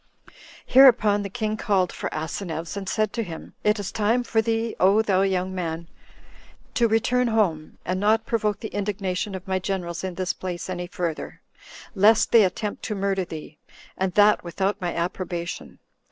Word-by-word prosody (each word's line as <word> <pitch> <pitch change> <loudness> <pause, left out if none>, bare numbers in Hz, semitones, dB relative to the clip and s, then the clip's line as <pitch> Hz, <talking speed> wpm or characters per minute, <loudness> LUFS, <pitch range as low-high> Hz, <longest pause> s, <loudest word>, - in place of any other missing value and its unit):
Hereupon 225 -6 +6
the 200 - -4
king 215 +1 -2
called 190 -4 +1
for - - -4
Asineus, 160 +2 -4
and 195 -2 -4
said 215 0 0
to 230 - -1
him, 170 -7 -8
"It 210 +1 +3
is 205 -2 -4
time 225 +4 +1
for 225 -2 +1
thee, 225 0 -1
O 200 +4 +5
thou 190 -3 +2
young 190 -1 0
man! 170 -2 -4 0.9
to 235 - +3
return 245 +3 +2
home, 190 -9 0
and 185 +1 -1
not 220 +2 +2
provoke 215 -5 -1
the 220 - -5
indignation 200 -1 -2
of 190 +1 -8
my 190 0 0
generals 180 -2 -3
in 185 -2 -4
this 185 0 -1
place 185 0 -5
any 175 -1 -4
further, 170 -3 -4 0.5
lest 210 +2 +4
they 230 -2 +7
attempt 205 +2 -2
to 215 - -2
murder 195 -1 0
thee, 155 -2 -9 0.4
and 185 -1 -2
that 210 0 +5
without 190 +4 -2
my 175 -1 -1
approbation. 175 0 -4
195 Hz, 170 wpm, -24 LUFS, 180-215 Hz, 0.9 s, they